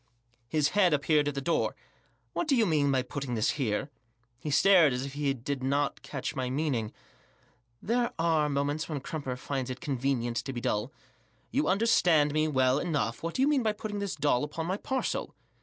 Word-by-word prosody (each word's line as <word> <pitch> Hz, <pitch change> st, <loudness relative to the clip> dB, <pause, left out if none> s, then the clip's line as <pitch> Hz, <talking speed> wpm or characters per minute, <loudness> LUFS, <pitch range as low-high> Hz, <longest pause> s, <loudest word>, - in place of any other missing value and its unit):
His 150 Hz, +2 st, +1 dB
head 185 Hz, -6 st, +4 dB
appeared 150 Hz, 0 st, +2 dB
at 145 Hz, -, -2 dB
the 140 Hz, -, -2 dB
door* 165 Hz, +4 st, 0 dB, 0.6 s
"What 345 Hz, -, -1 dB
do 285 Hz, -, +3 dB
you 230 Hz, -3 st, +4 dB
mean 150 Hz, -6 st, +2 dB
by 130 Hz, -1 st, +2 dB
putting 135 Hz, -1 st, -4 dB
this 110 Hz, -, +2 dB
hefe?" 125 Hz, -2 st, -1 dB, 0.5 s
He 150 Hz, -, -5 dB
stared, 170 Hz, -1 st, +5 dB
as 125 Hz, +2 st, -2 dB
if 140 Hz, -, -7 dB
he 145 Hz, -1 st, 0 dB
did 135 Hz, +2 st, -4 dB
not 140 Hz, +2 st, 0 dB
catch 140 Hz, -1 st, -5 dB
my 130 Hz, -2 st, -2 dB
meaning, 130 Hz, -6 st, -1 dB, 0.9 s
There 235 Hz, +2 st, +1 dB
are 160 Hz, -2 st, +2 dB
moments 145 Hz, +3 st, -1 dB
when 150 Hz, -4 st, -3 dB
Crumper 135 Hz, -4 st, -4 dB
finds 130 Hz, 0 st, -3 dB
it 130 Hz, 0 st, -5 dB
convenient 130 Hz, -5 st, -1 dB
to 135 Hz, +3 st, -3 dB
be 120 Hz, -, -3 dB
dull 120 Hz, 0 st, -1 dB, 0.6 s
"You 285 Hz, +3 st, +1 dB
understand 175 Hz, -8 st, +3 dB
me 155 Hz, 0 st, +2 dB
well 130 Hz, -2 st, +2 dB
enough; 150 Hz, -9 st, -1 dB
what 165 Hz, 0 st, -4 dB
do 260 Hz, -, +2 dB
you -, -, +4 dB
mean 290 Hz, -3 st, +3 dB
by 220 Hz, -2 st, +1 dB
putting 210 Hz, -1 st, -5 dB
this 200 Hz, -2 st, -3 dB
doll 145 Hz, -3 st, +1 dB
upon 155 Hz, +2 st, -4 dB
my 185 Hz, +3 st, -1 dB
parcel 265 Hz, +4 st, -2 dB
145 Hz, 195 wpm, -29 LUFS, 130-170 Hz, 0.9 s, stared